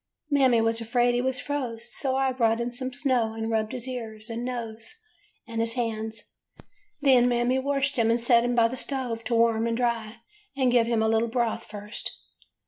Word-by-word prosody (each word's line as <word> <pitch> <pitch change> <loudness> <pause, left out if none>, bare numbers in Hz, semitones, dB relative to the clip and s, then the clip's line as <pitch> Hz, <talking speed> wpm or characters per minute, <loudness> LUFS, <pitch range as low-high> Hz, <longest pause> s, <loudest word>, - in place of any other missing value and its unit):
"Mammy 260 -5 +4
was 225 0 0
afraid 240 +2 +2
he 245 - +1
was 260 0 0
froze, 240 -5 -4
so 265 -2 -1
I 265 0 +2
brought 230 -3 +1
in 235 +1 -2
some 255 +2 -5
snow 255 -5 0
and 225 0 -3
rubbed 220 -1 0
his 250 0 -4
ears, 225 -3 -6
and 230 +1 -4
nose, 230 - -5 0.5
and 230 -1 -2
his 230 0 +2
hands. 225 -2 -3 0.8
Then 255 -3 +5
Mammy 245 +2 +2
washed 275 0 0
him 230 -1 +3
and 230 +1 +3
set 235 0 +4
him 245 0 0
by 230 -1 +5
the 255 +3 -6
stove 250 -4 -2
to 235 - 0
warm 230 0 +3
and 230 0 -1
dry, 235 -2 -2 0.4
and 260 -2 +3
give 235 -2 +4
him 230 -2 +1
a - - +2
little 225 +1 +2
broth 235 -1 -1
first. 210 +1 -7
235 Hz, 200 wpm, -26 LUFS, 225-255 Hz, 0.8 s, Then